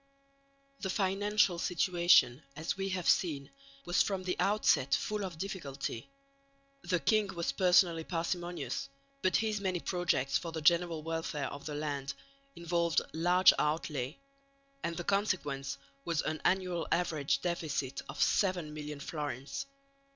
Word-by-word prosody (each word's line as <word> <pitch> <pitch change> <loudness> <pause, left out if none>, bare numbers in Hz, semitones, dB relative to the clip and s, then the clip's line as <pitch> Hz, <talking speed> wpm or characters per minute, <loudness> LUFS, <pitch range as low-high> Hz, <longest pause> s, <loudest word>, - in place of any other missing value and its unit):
The 190 - -3
financial 195 -1 +2
situation, 175 -8 +4
as 155 +2 -2
we 195 0 -2
have 185 -2 -2
seen, 145 -6 +2 0.3
was 175 - +3
from 195 -2 0
the 180 0 -1
outset 200 -9 +3
full 210 -1 -2
of 180 -4 -5
difficulty. 140 - -5 0.7
The 180 0 0
king 215 +3 +2
was 170 -1 -1
personally 175 -3 +4
parsimonious, 175 +9 -3 0.3
but 185 -3 +2
his 215 0 +1
many 185 -2 0
projects 175 -7 0
for 170 - -6
the 160 - -4
general 165 0 +3
welfare 160 -3 -2
of 140 +1 -8
the 150 - -4
land 140 -2 -3 0.4
involved 170 -2 +1
large 175 +3 +5
outlay, 150 -2 -1 0.7
and 170 -1 -2
the 175 - -3
consequence 175 -9 -1 0.3
was 165 -2 0
an 155 -1 -3
annual 180 -2 +1
average 160 -5 +1
deficit 150 -6 -2
of - - -7
seven 180 -6 +2
million 150 -1 -6
florins. 145 - -4
170 Hz, 135 wpm, -32 LUFS, 150-185 Hz, 0.7 s, large